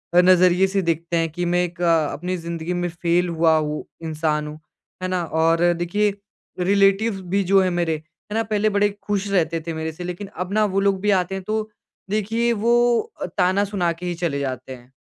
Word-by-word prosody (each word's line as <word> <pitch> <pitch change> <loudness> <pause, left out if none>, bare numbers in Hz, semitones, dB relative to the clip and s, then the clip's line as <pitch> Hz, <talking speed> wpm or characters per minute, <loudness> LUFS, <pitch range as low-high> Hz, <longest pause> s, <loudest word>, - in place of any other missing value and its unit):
नज़रिए 180 +1 +5
से 195 0 0
देखते 170 +1 -1
हैं 165 0 +1
कि 175 +3 -3
मैं 180 0 +3
एक 175 0 -6
अ, 165 -3 +3
अपनी 180 +4 -3
ज़िन्दगी 170 0 -4
में 175 - -1
फ़ेल 175 +1 0
हुआ 165 -1 +3
हूँ, 150 -1 -2 0.2
इंसान 155 -1 -1
हूँ। 150 +1 -8 0.4
है - - 0
ना? 185 -1 -1
और 165 +1 +2 0.2
देखिए 205 +4 +1 0.5
रिलेटिव्स 195 +3 +3 0.2
भी 200 - +3
जो 195 - +7
है 185 - +2
मेरे 170 -2 0
है 160 +6 -13
ना, 225 +1 +1
पहले 215 -1 +1
बड़े 205 0 +2 0.2
ख़ुश 205 -1 -1
रहते 165 -3 +1
थे 165 - -2
मेरे 160 0 -3
से 160 +3 -9
लेकिन 180 +3 -5
अब 180 +2 -4
ना 215 0 +3
वो 195 - +2
लोग 195 -1 +1
भी 210 +1 +2
आते 180 +2 -5
हैं 190 - -5
तो 215 0 -1 0.4
देखिए 225 +3 0
वो 235 0 +5 0.6
ताना 185 +2 +3
सुना 175 -4 +1
के 180 - -6
ही 175 -1 -2
चले 165 -5 -2
जाते 130 -1 -4
हैं। 125 +1 -18
180 Hz, 205 wpm, -22 LUFS, 165-195 Hz, 0.6 s, जो